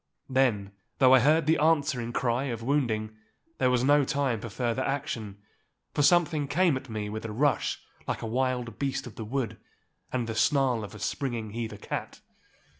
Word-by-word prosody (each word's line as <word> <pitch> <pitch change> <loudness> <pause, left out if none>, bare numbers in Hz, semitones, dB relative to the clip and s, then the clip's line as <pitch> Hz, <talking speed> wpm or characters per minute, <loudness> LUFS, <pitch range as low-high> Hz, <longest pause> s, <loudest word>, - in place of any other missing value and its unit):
Then, 115 -7 +2 0.3
though 130 -1 +6
I 130 - +8
heard 155 +5 +4
the 160 +2 +3
answering 145 -6 +2
cry 120 +2 0
of 115 -4 -4
wounding, 115 -6 0 0.4
there 130 - +3
was 125 -1 +2
no 145 +2 +5
time 135 -5 0
for 115 - -6
further 115 +3 -1
action, 115 -7 -3 0.6
for - - +1
something 160 -2 +3
came 170 +1 +3
at 130 0 -6
me 105 -2 -3
with 110 +1 -5
a 115 - -5
rush 140 +6 +1 0.3
like - - -3
a - - -2
wild 125 -1 -1
beast 140 -1 -1
of 120 - -9
the 110 - -7
wood, 125 +1 -3 0.5
and 125 -2 -1
the 115 - -4
snarl 130 -2 +2
of 105 - -8
the 105 - -10
springing 115 -2 -3
heather 110 -1 -4
cat. - - -5
125 Hz, 185 wpm, -28 LUFS, 115-140 Hz, 0.6 s, I